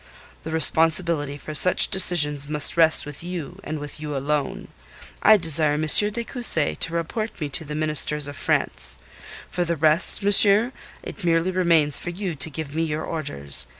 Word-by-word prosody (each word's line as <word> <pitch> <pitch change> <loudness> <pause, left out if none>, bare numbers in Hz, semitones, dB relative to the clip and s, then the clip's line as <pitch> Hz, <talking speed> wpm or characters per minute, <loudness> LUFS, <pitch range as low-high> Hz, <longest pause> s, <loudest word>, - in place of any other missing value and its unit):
The 160 - -9
responsibility 160 -2 +1
for 155 - -10
such 180 +5 +4
decisions 150 -6 +2
must 150 -1 +1
rest 160 -1 +4
with 145 +2 -9
you, 180 0 -8
and 155 - -6
with 145 0 -9
you 150 -2 -6
alone. 145 +1 -4 0.5
I 215 - +5
desire 160 -4 +2
M. 155 +1 -3
de 210 +8 +2
Cussy 230 - -2
to 165 - -3
report 215 +7 -5
me 150 -3 -5
to 160 +4 -1
the 150 0 -8
Ministers 150 -1 +1
of 145 - -9
France. 60 - -3 0.5
For 180 - -2
the 170 0 -3
rest, 160 +5 +1
monsieur, 205 +3 +4 0.3
it 205 - -10
merely 170 +1 0
remains 170 -5 +1
for - - -7
you 180 0 -6
to 145 +1 -2
give 150 -1 -8
me 160 - -3
your 155 -1 -4
orders. 70 - +3
160 Hz, 175 wpm, -21 LUFS, 150-175 Hz, 0.5 s, I